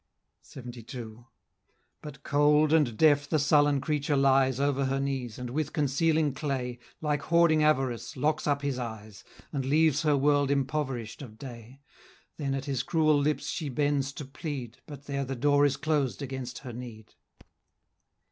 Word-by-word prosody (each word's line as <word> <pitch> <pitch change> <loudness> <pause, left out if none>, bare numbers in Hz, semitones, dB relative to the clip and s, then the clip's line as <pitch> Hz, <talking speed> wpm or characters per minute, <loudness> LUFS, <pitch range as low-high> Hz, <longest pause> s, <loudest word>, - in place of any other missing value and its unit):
LXXII. 120 -2 -9 0.8
But 150 -3 -10
cold 150 +1 +3
and 140 -9 +2
deaf 145 -2 +4
the 155 - +2
sullen 145 -1 +3
creature 145 0 0
lies 135 -1 +3
Over 140 -1 +1
her 135 +1 0
knees, 135 -5 -3
and 125 -1 -6
with 155 +3 -2
concealing 150 0 +1
clay, 130 -4 -3 0.2
Like 150 -2 0
hoarding 170 0 +3
Avarice, 135 -5 0
locks 150 +4 0
up 145 -1 0
his 140 -2 -1
eyes, 110 -3 -7 0.3
And 140 -2 -1
leaves 155 +2 +3
her 150 -3 +2
world 145 0 +2
impoverish'd 135 -4 -2
of 110 -6 -10
day; 125 +1 -11 0.6
Then 140 -3 -2
at 135 0 -4
his 135 -4 -1
cruel 155 +1 +2
lips 150 +1 0
she 155 -4 -3
bends 140 0 0
to 145 - -7
plead, 135 -4 -6
But 145 -2 -10
there 140 -1 -2
the 135 0 -4
door 145 +3 +4
is 140 0 -2
closed 150 -2 -1
against 130 -2 -5
her 120 - -6
need. 115 -3 -10
140 Hz, 155 wpm, -28 LUFS, 130-150 Hz, 0.8 s, deaf